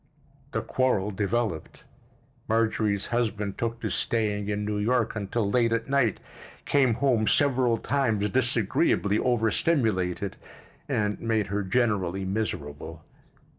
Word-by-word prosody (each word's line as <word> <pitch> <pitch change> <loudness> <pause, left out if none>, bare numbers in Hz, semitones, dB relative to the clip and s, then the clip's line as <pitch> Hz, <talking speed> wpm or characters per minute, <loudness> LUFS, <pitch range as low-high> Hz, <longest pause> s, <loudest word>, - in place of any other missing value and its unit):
The - - -2
quarrel 110 -6 0
developed. 100 -2 -2 0.6
Marjorie's 110 -2 +1
husband 105 -4 -1
took 115 -1 -2
to - - -2
staying 105 -3 0
in 105 0 -2
New 105 0 -2
York 115 +1 +1
until 105 +1 -1
late 115 +2 +2
at 115 +3 -1
night, 135 -7 +2 0.5
came 130 -5 +3
home 120 -5 +2
several 130 -5 +3
times 110 -8 0
disagreeably 115 - +1
overstimulated, 110 - 0 0.5
and 105 -1 0
made 110 -2 +1
her 105 - 0
generally 95 -3 0
miserable. 95 -8 -4
110 Hz, 115 wpm, -26 LUFS, 100-120 Hz, 0.6 s, came